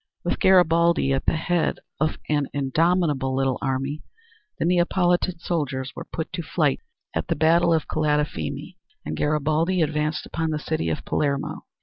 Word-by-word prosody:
With -, -, -1 dB
Garibaldi 170 Hz, -5 st, +4 dB
at 135 Hz, -, -2 dB
the -, -, +3 dB
head 170 Hz, +1 st, 0 dB, 0.2 s
of 155 Hz, +1 st, 0 dB
an 145 Hz, -2 st, +1 dB
indomitable 145 Hz, -1 st, +1 dB
little 135 Hz, -1 st, 0 dB
army, 135 Hz, +3 st, -2 dB, 0.6 s
the -, -, -1 dB
Neapolitan 175 Hz, 0 st, +2 dB
soldiers 135 Hz, -6 st, -3 dB
were -, -, -7 dB
put 160 Hz, +3 st, -4 dB
to 175 Hz, -, -2 dB
flight 155 Hz, -3 st, 0 dB, 0.3 s
at -, -, -2 dB
the -, -, 0 dB
battle 165 Hz, +3 st, +4 dB
of 160 Hz, -2 st, +1 dB
Calatafimi 150 Hz, -, -1 dB, 0.3 s
and 75 Hz, -, -3 dB
Garibaldi 155 Hz, -, +1 dB
advanced 150 Hz, 0 st, -1 dB
upon 160 Hz, -1 st, -2 dB
the 155 Hz, -, -1 dB
city 150 Hz, -, -2 dB
of 80 Hz, -, -3 dB
Palermo. 140 Hz, -2 st, -1 dB
155 Hz, 150 wpm, -24 LUFS, 140-170 Hz, 0.6 s, Garibaldi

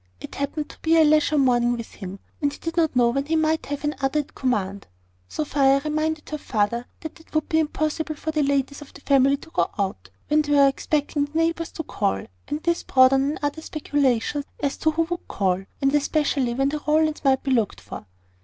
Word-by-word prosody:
It -, -, -9 dB
happened 290 Hz, +2 st, -3 dB
to -, -, -17 dB
be 330 Hz, 0 st, +3 dB
a 320 Hz, -, +7 dB
leisure 305 Hz, 0 st, +3 dB
morning 245 Hz, -3 st, +3 dB
with 230 Hz, -, -7 dB
him, 195 Hz, -1 st, -8 dB, 0.2 s
and 285 Hz, -1 st, +1 dB
he -, -, -10 dB
did 330 Hz, 0 st, -5 dB
not 320 Hz, -5 st, +1 dB
know 240 Hz, -1 st, +4 dB
when 275 Hz, +3 st, -1 dB
he 325 Hz, -, +1 dB
might 315 Hz, 0 st, +1 dB
have 285 Hz, +1 st, -4 dB
another 295 Hz, 0 st, 0 dB
at 290 Hz, -, -16 dB
command. 200 Hz, -6 st, -2 dB, 0.4 s
Sophia 275 Hz, -2 st, +2 dB
reminded 310 Hz, 0 st, -1 dB
her 305 Hz, -, -3 dB
father 235 Hz, 0 st, -1 dB
that 315 Hz, +1 st, -8 dB
it 320 Hz, -, -19 dB
would 310 Hz, -, +1 dB
be 320 Hz, -, +3 dB
impossible 310 Hz, 0 st, -1 dB
for 315 Hz, +1 st, -4 dB
the 305 Hz, -1 st, 0 dB
ladies 280 Hz, 0 st, 0 dB
of 295 Hz, -, -12 dB
the 280 Hz, -, -12 dB
family 275 Hz, 0 st, +3 dB
to 320 Hz, -, -15 dB
go -, -, +1 dB
out, 190 Hz, -, -3 dB, 0.2 s
when 305 Hz, +1 st, +3 dB
they 295 Hz, -1 st, -1 dB
were 280 Hz, -1 st, +6 dB
expecting 290 Hz, +1 st, 0 dB
the 295 Hz, +2 st, -6 dB
neighbours 330 Hz, 0 st, 0 dB
to 320 Hz, -, -4 dB
call: 95 Hz, -, -1 dB, 0.2 s
and 300 Hz, +1 st, -4 dB
this 340 Hz, -1 st, +1 dB
brought 260 Hz, 0 st, +5 dB
on 275 Hz, +2 st, +1 dB
another 290 Hz, +2 st, -3 dB
speculation 285 Hz, -3 st, 0 dB, 0.2 s
as 280 Hz, -1 st, -1 dB
to 315 Hz, -, +2 dB
who 320 Hz, +1 st, +1 dB
would 345 Hz, +1 st, -5 dB
call, 190 Hz, -1 st, 0 dB, 0.2 s
and 275 Hz, +1 st, +3 dB
especially 285 Hz, -4 st, +1 dB
when 270 Hz, +2 st, +1 dB
the 300 Hz, +1 st, -3 dB
Rowlands 310 Hz, 0 st, +2 dB
might 265 Hz, -2 st, +3 dB
be 270 Hz, -, -1 dB
looked 230 Hz, -6 st, +1 dB
for. -, -, -9 dB
290 Hz, 220 wpm, -24 LUFS, 265-310 Hz, 0.4 s, a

